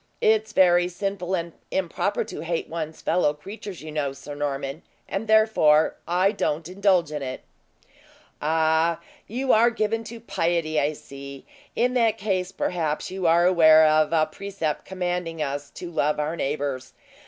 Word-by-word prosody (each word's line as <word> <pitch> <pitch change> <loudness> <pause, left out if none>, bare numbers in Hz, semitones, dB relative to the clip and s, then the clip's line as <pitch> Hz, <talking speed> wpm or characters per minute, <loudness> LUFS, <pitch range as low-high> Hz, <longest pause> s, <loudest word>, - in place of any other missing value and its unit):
It's 220 0 +2
very 175 -3 +4
sinful 190 0 -3
and 170 -2 -4 0.2
improper 190 +2 -1
to 220 - -8
hate 165 0 -2
one's 160 -1 -6
fellow 150 -5 +2
creatures, 195 +2 -9
you 155 - -7
know, 145 -3 -2
Sir 140 +2 -9
Norman, 140 +1 -3 0.3
and 200 +3 -3
therefore 215 -9 +4
I 185 +3 +3
don't 160 -6 -2
indulge 185 -3 +2
in 150 -1 -4
it." 130 -1 -5 1.0
"Ah! 160 +1 +2 0.3
you 255 +4 0
are 230 +2 +5
given 225 -1 -1
to 230 +1 -8
piety, 165 -7 0
I 150 +2 +1
see. 140 -1 -10 0.3
In 250 +1 +1
that 230 -3 +2
case, 190 -3 -1
perhaps 160 -3 -2
you 190 -2 -1
are 170 +1 +4
aware 160 -3 +7
of 155 0 +3
a 160 -2 +3
precept 185 -2 -4
commanding 180 -3 -3
us 145 -1 -3
to 175 -1 -7
love 150 -2 0
our 150 +2 -1
neighbors. 135 -4 -3
170 Hz, 155 wpm, -24 LUFS, 150-195 Hz, 1.0 s, aware